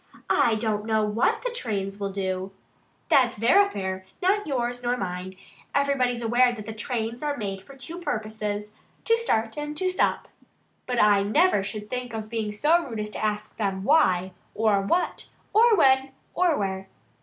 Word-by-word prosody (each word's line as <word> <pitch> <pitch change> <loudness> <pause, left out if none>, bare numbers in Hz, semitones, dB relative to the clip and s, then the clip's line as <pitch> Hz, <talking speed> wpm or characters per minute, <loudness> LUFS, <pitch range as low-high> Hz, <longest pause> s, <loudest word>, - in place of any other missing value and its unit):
"I 230 - +4
don't 215 -1 -2
know 220 -1 +2
what 210 +3 +1
the - - -1
trains 200 - -3
will 200 -1 -2
do. 190 -1 -3 0.6
That's 250 -4 +4
their 245 - +5
affair 190 - -4 0.2
not 395 +2 +1
yours 245 -3 -2
nor 245 0 0
mine. 185 -1 -5 0.4
Everybody's 255 -4 +1
aware 245 +2 +4
that 220 -1 -7
trains 230 0 -3
are 295 -1 -2
made 195 -3 -4
for 275 +8 -14
two 325 +7 -7
purposes 215 -6 -4 0.3
to 460 - +4
start 225 - -1
and 295 0 -5
to 370 +2 +1
stop. 365 - 0 0.6
But 245 -1 -1
I 205 -1 +5
never 220 - +3
should 210 +1 -6
think 250 0 -4
of 215 0 -6
being 220 -2 -2
so 310 +11 +3
rude 230 -7 -6
as 210 0 -3
to - - -5
ask 215 0 -2
them 195 -3 -2
WHY, 185 - +3 0.2
or 215 -2 +2
WHAT, 340 - -1 0.3
or 455 +1 +6
WHEN, 265 -5 +4 0.2
or 350 -4 +2
WHERE." 190 -1 -3
225 Hz, 170 wpm, -25 LUFS, 205-275 Hz, 0.6 s, or